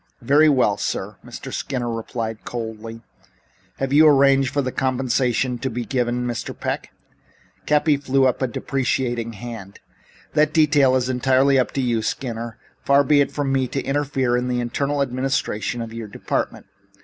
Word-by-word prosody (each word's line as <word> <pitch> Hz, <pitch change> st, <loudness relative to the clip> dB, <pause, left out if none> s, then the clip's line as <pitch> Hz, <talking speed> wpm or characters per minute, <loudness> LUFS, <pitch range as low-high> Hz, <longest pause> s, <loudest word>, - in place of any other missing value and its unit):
"Very 145 Hz, +5 st, +5 dB
well, 125 Hz, -8 st, +3 dB
sir," -, -, -3 dB
Mr. -, -, -9 dB
Skinner 125 Hz, -3 st, -3 dB
replied 115 Hz, -1 st, -4 dB
coldly. 115 Hz, -1 st, -6 dB, 0.8 s
"Have 135 Hz, 0 st, -2 dB
you 155 Hz, +2 st, +7 dB
arranged 135 Hz, -1 st, +4 dB
the 135 Hz, -3 st, 0 dB
compensation 130 Hz, -1 st, 0 dB
to 130 Hz, -, -2 dB
be 120 Hz, 0 st, -4 dB
given 125 Hz, -1 st, -1 dB
Mr. 120 Hz, -2 st, -4 dB
Peck?" -, -, -3 dB, 0.8 s
Cappy 150 Hz, 0 st, +3 dB
threw 135 Hz, -1 st, +2 dB
up 130 Hz, -, +1 dB
a 130 Hz, -, +2 dB
deprecating 120 Hz, -2 st, -2 dB
hand. 110 Hz, -3 st, -9 dB, 0.5 s
"That 155 Hz, 0 st, +3 dB
detail 145 Hz, -5 st, +4 dB
is 125 Hz, -1 st, +1 dB
entirely 130 Hz, +2 st, +3 dB
up 125 Hz, -, +1 dB
to 135 Hz, -, -1 dB
you, 120 Hz, -3 st, 0 dB
Skinner. 115 Hz, -1 st, -4 dB, 0.3 s
Far 140 Hz, +1 st, +4 dB
be 145 Hz, +1 st, +4 dB
it 140 Hz, -, 0 dB
from 140 Hz, -2 st, -1 dB
me 130 Hz, -1 st, +1 dB
to 135 Hz, -, -3 dB
interfere 135 Hz, -3 st, 0 dB
in 125 Hz, 0 st, 0 dB
the 125 Hz, -1 st, -1 dB
internal 140 Hz, +4 st, -1 dB
administration 125 Hz, -3 st, -2 dB
of 115 Hz, 0 st, -8 dB
your 115 Hz, -1 st, -6 dB
department. 100 Hz, -, -3 dB
130 Hz, 160 wpm, -22 LUFS, 120-140 Hz, 0.8 s, you